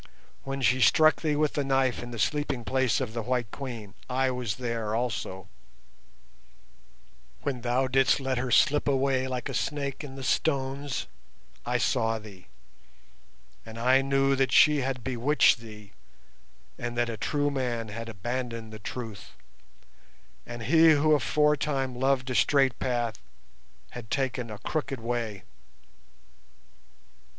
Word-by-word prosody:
When 135 0 -4
she 125 +3 +3
struck 155 +7 +5
thee 155 -2 0
with 150 0 +1
the 145 - 0
knife 135 -2 +1
in 120 - -7
the 120 - -7
sleeping 135 +2 -1
place 130 -1 +1
of 125 -5 -4
the 115 - -2
White 120 -2 -2
Queen 115 -7 -7 0.2
I 130 +1 +1
was 125 -6 -3
there 115 -3 -3
also; 110 -6 -3 2.0
when 130 -4 -2
thou 125 +2 +1
didst 130 0 +3
let 135 -2 -1
her 130 0 -2
slip 145 +4 +3
away 135 -1 +1
like 125 -2 -3
a - - -5
snake 140 -1 -2
in 135 -2 -8
the 135 - -7
stones 135 -1 -1 0.6
I - - +1
saw 115 0 +1
thee, 100 -4 -13 1.2
and 115 0 -10
I 130 +3 +4
knew 135 0 +2
that 135 -2 +1
she 150 +4 +6
had 130 -2 -3
bewitched 130 +2 +3
thee 105 -3 -12 0.9
and 120 0 -4
that 120 0 +2
a 115 - -4
true 145 +6 -1
man 120 -5 -2
had 115 +2 -6
abandoned 115 +1 -5
the 110 - -8
truth, 110 -2 -7 1.1
and 120 -1 -7
he 160 +6 +6
who 155 +1 +3
aforetime 150 -2 +1
loved 130 0 +1
a - - -1
straight 135 0 +3
path 120 -4 -1 0.7
had 120 -3 -9
taken 130 -3 -2
a 105 - -7
crooked 140 +4 -3
way. 115 -4 -3
130 Hz, 140 wpm, -27 LUFS, 115-135 Hz, 2.0 s, she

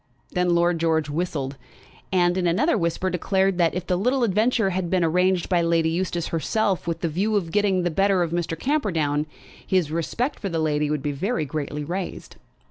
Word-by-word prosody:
Then 180 -1 +1
Lord 170 0 +2
George 160 -3 +1
whistled, 145 -4 -3 0.5
and, 175 -1 +3
in 185 -2 +1
another 230 - +2
whisper, 180 0 -1
declared 190 +1 +1
that, 170 -1 +2
if 180 -1 -3
the 180 - 0
little 250 +7 +1
adventure 220 0 +2
had 185 0 -1
all - - -5
been 185 -1 +2
arranged 180 +2 +2
by 180 -2 +2
Lady 165 -1 +2
Eustace 175 -1 -2
herself 190 +3 0
with 165 -1 -2
the 170 - 0
view 195 +7 0
of 175 -5 -1
getting 195 -2 +2
the 175 - 0
better 195 +1 +2
of 165 - -3
Mr. 170 -1 -2
Camperdown, 160 - 0 0.4
his 180 -5 +1
respect 200 - -2
for 195 - -3
that 165 - -2
lady 150 -2 0
would 150 -2 -2
be 145 - -1
very 165 - -1
greatly 150 0 -4
raised. 180 +5 -5
175 Hz, 200 wpm, -24 LUFS, 160-190 Hz, 0.5 s, and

